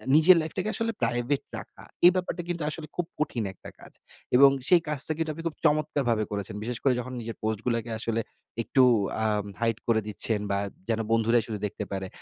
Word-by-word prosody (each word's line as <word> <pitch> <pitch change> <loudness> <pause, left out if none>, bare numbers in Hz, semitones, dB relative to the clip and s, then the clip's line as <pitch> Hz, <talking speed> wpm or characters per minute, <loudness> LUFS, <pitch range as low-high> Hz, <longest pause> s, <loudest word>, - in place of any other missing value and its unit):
নিজের 165 +4 +8
লাইফটাকে 185 +6 -3
আসলে 230 0 0
প্রাইভেট 120 +4 0 0.2
রাখা, - - -11 0.2
এই 175 - +10
ব্যাপারটা 180 -1 -2
কিন্তু 170 -2 -2
আসলে 155 0 -5
খুব 175 - -1
কঠিন 135 -6 -1
একটা - - -12
কাজ। - - -14 0.4
এবং 140 +2 +9 0.2
সেই 180 -2 +6
কাজটা 150 0 +1
কিন্তু 160 -1 -1
আপনি 165 +2 -8
খুব 160 - -5
চমৎকারভাবে 145 -7 +2
করেছেন। 100 -1 -3
বিশেষ 120 +1 -3
করে 135 - +4
যখন 125 +1 -6
নিজের 115 0 -6
পোস্টগুলাকে 115 +2 -1
আসলে 115 0 -1 0.4
একটু 130 +3 +3 0.4
আ - - +2 0.4
hide 115 -1 +1
করে 115 -2 +3
দিচ্ছেন 105 +1 -1
বা, 100 - +1 0.3
যেন 115 -1 +1
বন্ধুরাই 115 +1 +3
শুধু 110 -3 -4
দেখতে 105 0 -4
পারে। 95 -1 -3
120 Hz, 185 wpm, -27 LUFS, 110-155 Hz, 0.4 s, এই